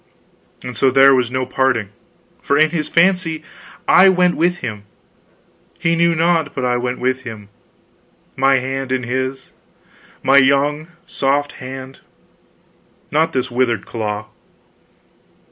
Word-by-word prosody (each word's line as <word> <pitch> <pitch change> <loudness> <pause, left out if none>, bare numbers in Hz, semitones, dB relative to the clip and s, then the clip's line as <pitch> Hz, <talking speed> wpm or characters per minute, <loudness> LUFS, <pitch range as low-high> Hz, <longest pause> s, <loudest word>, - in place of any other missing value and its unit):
And 125 -1 -7
so 135 - +3
there 135 +1 +6
was 125 -3 +1
no 130 0 -2
parting, 130 -5 0 0.5
for 140 - +1
in 155 +1 +3
his 155 -3 -3
fancy 170 -3 +1 0.4
I 190 +1 +7
went 180 -1 +2
with 175 +2 +1
him; 105 -7 -7 0.9
he 165 -1 0
knew 170 0 +2
not 165 -2 +1
but 130 - -2
I 125 0 +1
went 125 +1 -3
with 130 +1 -1
him, 110 -5 -10 0.9
my 135 +1 +3
hand 135 0 -3
in 130 -1 -1
his 130 +2 -4 0.7
my 135 +1 +6
young 140 +3 +1 0.2
soft 140 +1 -1
hand, 130 +1 -9 1.1
not 160 +2 +1
this 130 -3 -2
withered 120 -2 0
claw. 105 -2 -4
135 Hz, 130 wpm, -18 LUFS, 125-155 Hz, 1.1 s, I